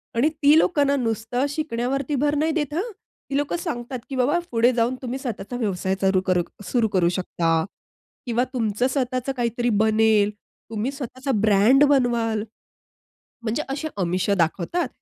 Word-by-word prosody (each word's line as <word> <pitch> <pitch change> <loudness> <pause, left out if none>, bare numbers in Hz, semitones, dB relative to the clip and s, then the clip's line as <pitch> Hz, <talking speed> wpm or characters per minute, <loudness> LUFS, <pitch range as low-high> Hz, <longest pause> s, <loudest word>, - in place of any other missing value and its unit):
आणि 250 +7 +3
ती 300 -1 +4
लोकांना 290 -5 +2
नुसतं 235 0 -1
शिकण्यावरती 275 -1 -2
भर 290 +2 +1
नाही 310 +2 +1
देत 295 -3 -2
हं. 390 +9 -2 0.4
ती 275 - 0
लोकं 290 +4 -1
सांगतात 255 -7 -4
की 270 - -4
बाबा 270 +7 +2
पुढे 235 +1 +4
जाऊन 240 +1 +1
तुम्ही 255 +1 -4
स्वतःचा 240 -3 -5
व्यवसाय 190 -4 -1
चालू 190 -1 +3
करू 180 -1 +2 0.2
सुरू 230 +2 +1
करू 175 -2 +4
शकता 170 -2 0 0.7
किंवा 240 0 +1
तुमचं 225 0 0
स्वतःच 255 -1 -2
काहीतरी 240 0 0
बनेल, 220 -1 +4 0.4
तुम्ही 225 +3 -2
स्वतःचा 270 0 -5
ब्रँड 215 +7 +5
बनवाल 235 -6 +2 1.0
म्हणजे 230 +5 -1
असे 280 +3 -3
अमिष 185 0 -1
दाखवतात. 175 - 0
245 Hz, 150 wpm, -23 LUFS, 220-280 Hz, 1.0 s, ब्रँड